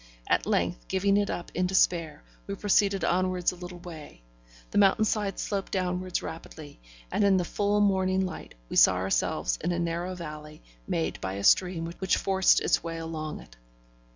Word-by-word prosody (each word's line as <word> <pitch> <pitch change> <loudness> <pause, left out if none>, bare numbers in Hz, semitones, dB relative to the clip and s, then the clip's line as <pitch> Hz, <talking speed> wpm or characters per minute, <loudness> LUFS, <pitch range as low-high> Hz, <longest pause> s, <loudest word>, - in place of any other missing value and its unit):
At - - +1
length, - - -1
giving 195 +1 +1
it 205 -1 +1
up 175 - -5
in 180 +1 0
despair, 170 -5 +1 0.2
we 200 - -3
proceeded 200 -1 +2
onwards 185 0 +1
a - - -10
little 180 0 -9
way; 160 - -11 0.5
the - - +2
mountain 200 +2 +4
side 205 -3 -1
sloped 200 -2 -3
downwards 185 -1 -2
rapidly, 160 - -9 0.3
and - - +1
in 195 -1 +4
the 180 - 0
full 205 +3 0
morning 190 -1 +2
light 185 - -8
we - - -4
saw 95 - +7
ourselves 90 -9 0
in - - 0
a 175 - -1
narrow 170 +2 -2
valley, 150 -3 -9 0.2
made 80 0 -2
by 95 0 -3
a 100 +1 -5
stream 180 - +3
which 190 -1 +1
forced 190 -1 +3
its - - +1
way 165 0 -4
along 160 -2 -5
it. - - -17
180 Hz, 180 wpm, -28 LUFS, 160-190 Hz, 0.5 s, saw